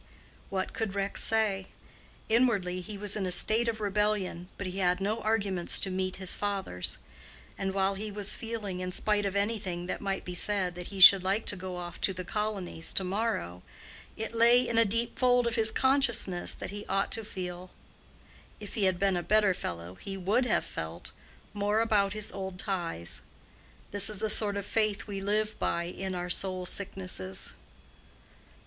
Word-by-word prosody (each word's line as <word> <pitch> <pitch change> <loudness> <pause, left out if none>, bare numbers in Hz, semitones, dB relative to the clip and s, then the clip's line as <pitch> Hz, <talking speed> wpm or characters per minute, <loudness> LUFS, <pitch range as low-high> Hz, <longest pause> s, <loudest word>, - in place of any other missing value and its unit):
What 190 -1 -2
could 215 -3 -3
Rex 200 0 +1
say? 210 -4 +2 0.6
Inwardly 210 -6 +2
he 205 +2 -8
was 205 0 -1
in 195 -3 -2
a - - -2
state 220 +6 +5
of 225 -1 -1
rebellion, 205 -3 -1
but 200 - -5
he 185 +1 -4
had 180 -1 +2
no 210 +3 -1
arguments 200 -5 +1
to 190 - -1
meet 185 0 -2
his 190 -2 -1
father's; 195 - -2 0.6
and 195 0 -2
while 195 0 +2
he 210 +2 -4
was 205 -1 +1
feeling, 215 -5 -4
in 185 0 -4
spite 205 +2 +1
of 195 - -4
any 210 +3 0
thing 175 -2 -5
that 185 - -4
might 195 -1 -3
be 180 - -5
said, 185 -1 +1
that 180 0 -7
he 195 - -8
should 190 0 +10
like 195 +4 0
to - - +1
go 185 -1 -6
off 175 -1 -8
to 190 - +2
"the 185 0 -6
colonies" 200 -4 -3
to 190 - +1
morrow, 185 - -2 0.6
it 220 +1 -4
lay 235 +2 +5
in 230 -1 +2
a 230 - +5
deep 230 +3 -1
fold 245 -1 +4
of 235 - 0
his 225 -1 +4
consciousness 235 -7 +2
that - - -6
he 205 0 -6
ought 195 0 0
to 225 - +1
feel—if 185 +2 -11
he 210 -4 +1
had 185 -1 +2
been 195 0 +2
a 175 - 0
better 210 +1 +3
fellow 85 - -6
he 195 - -7
would 205 +7 +1
have - - +1
felt—more 205 - -4
about 205 -3 +2
his 215 -1 -1
old 190 -1 -6
ties. 170 - -3 0.7
This 200 0 +3
is 215 - -6
the 215 +1 0
sort 205 -2 +3
of 200 - -3
faith 215 -2 0
we 200 -2 -5
live 210 +2 -1
by 170 - 0
in 185 +2 -5
our 175 0 -3
soul 185 -1 0
sicknesses. 185 - -1
195 Hz, 185 wpm, -29 LUFS, 185-215 Hz, 0.7 s, should